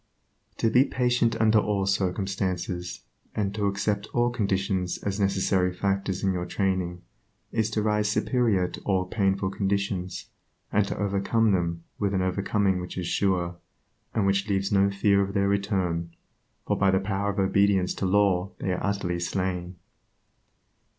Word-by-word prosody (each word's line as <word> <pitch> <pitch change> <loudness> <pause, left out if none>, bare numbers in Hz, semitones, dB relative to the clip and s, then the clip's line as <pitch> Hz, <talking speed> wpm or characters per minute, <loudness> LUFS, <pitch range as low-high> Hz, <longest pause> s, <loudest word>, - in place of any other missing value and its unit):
To 115 - +1
be 125 +3 +6
patient 125 -3 +1
under 110 0 +5
all 100 -2 0
circumstances, 95 -2 -2 0.3
and 100 -2 -1
to 105 -1 0
accept 100 +1 -1
all 120 0 +3
conditions 95 -4 -1
as 100 0 -2
necessary 95 -2 +2
factors 95 +1 -1
in 95 -1 +2
your 90 -1 -3
training, 90 -2 -1 0.5
is 110 -1 0
to 105 -1 -1
rise 105 -1 +1
superior 110 -5 +1
to - - -9
all 95 -2 0
painful 95 -1 0
conditions, 95 -2 -2 0.4
and 105 -1 +2
to - - -4
overcome 105 +2 +1
them 85 -3 -1 0.2
with 100 -1 0
an 95 - +1
overcoming 95 0 +1
which 90 - -7
is 90 - -2
sure, 90 -2 0 0.6
and 110 -3 +2
which 100 +1 +1
leaves 95 0 0
no 100 0 +4
fear 100 0 +3
of 100 0 -2
their 100 0 +2
return, 95 -4 -1 0.5
for - - +1
by 100 - +3
the 95 0 +3
power 100 0 -1
of 100 - -3
obedience 95 -1 +2
to 95 - -2
law 95 -1 +2
they 95 - -2
are 90 - -3
utterly 100 -4 -1
slain. 90 0 -2
100 Hz, 155 wpm, -26 LUFS, 95-100 Hz, 0.6 s, be